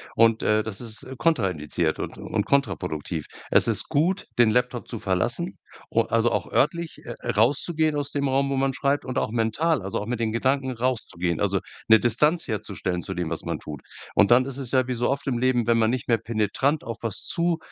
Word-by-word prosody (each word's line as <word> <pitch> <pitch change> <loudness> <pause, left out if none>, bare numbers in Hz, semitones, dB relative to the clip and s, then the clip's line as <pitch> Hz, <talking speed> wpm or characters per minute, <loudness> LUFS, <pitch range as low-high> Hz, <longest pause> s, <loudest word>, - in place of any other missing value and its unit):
und, 115 0 +4
äh, 105 0 +3
das 110 0 -4
ist, 110 -2 -4
äh, 130 +1 -8
kontraindiziert 95 - 0
und - - -6
und 105 -2 -2
kontraproduktiv. 85 - -1 0.2
Es - - +5
ist - - 0
gut, 175 +7 +1
den 120 -2 +5
Laptop 125 +1 0
zu 115 - -6
verlassen, 95 -2 -1 0.3
u - - +4
also 115 +1 +1
auch - - -2
örtlich, 165 +3 0
äh, - - -7
äh, - - -1
rauszugehen 150 - +1
aus 145 -1 -2
dem 140 -1 0
Raum, 135 +1 +1
wo - - 0
man 135 0 +1
schreibt 140 +1 0
und 130 - -4
auch - - 0
mental, 120 +6 +1
also 95 +1 -3
auch 105 - -4
mit 120 +1 -3
den 110 -2 0
Gedanken 130 +3 +1
rauszugehen, 110 -9 -2
also 100 -1 +1 0.3
'ne 110 - +8
Distanz 150 +9 +2
herzustellen 95 -5 -3
zu 95 +2 -6
dem, 85 -2 -3
was 80 - -1
man - - -3
tut. 75 -4 -8 0.3
Und 105 - +4
dann 125 +2 +6
ist 135 -1 -4
es 135 -4 -3
ja 130 -1 +2
wie 130 - -1
so 120 0 0
oft 140 +1 -2
im 125 -3 -1
Leben, 125 -2 +2
wenn 115 -1 +3
man 110 -1 +3
nicht 125 0 -2
mehr 115 -2 +3
penetrant 115 +7 0
auf 115 -1 -5
was 115 -4 -4
zu 170 0 0
120 Hz, 220 wpm, -25 LUFS, 105-135 Hz, 0.3 s, ne